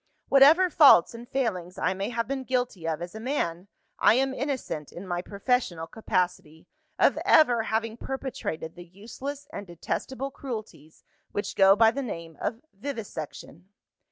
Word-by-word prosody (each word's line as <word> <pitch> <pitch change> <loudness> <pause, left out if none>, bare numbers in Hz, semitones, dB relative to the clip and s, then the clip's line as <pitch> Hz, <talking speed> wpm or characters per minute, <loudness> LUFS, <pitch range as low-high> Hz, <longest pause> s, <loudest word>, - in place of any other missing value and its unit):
Whatever 310 +7 +6
faults 275 - +7
and 235 +1 -10
failings 185 -9 -2
I 185 - +1
may 195 +3 -3
have 230 -1 -2
been 270 0 -3
guilty 245 -10 -2
of 165 +1 -2
as 175 - -8
a 220 - -7
man, 200 - -2 0.3
I - - +6
am 265 +1 +1
innocent, 260 - -4
in 185 +2 -9
my 175 -1 -2
professional 200 -4 -1
capacity, 175 -5 -2 0.3
of - - +3
ever 250 -7 +5
having 225 0 -2
perpetrated 250 -12 -5
the 175 - -10
useless 255 +10 -8
and 200 -1 -6
detestable 265 - -4
cruelties 220 - -8 0.3
which 205 - -3
go 195 0 +6
by 225 +1 +5
the 275 - -3
name 165 - -6
of 225 - -3
Vivisection. 195 - -7
220 Hz, 155 wpm, -27 LUFS, 175-265 Hz, 0.3 s, faults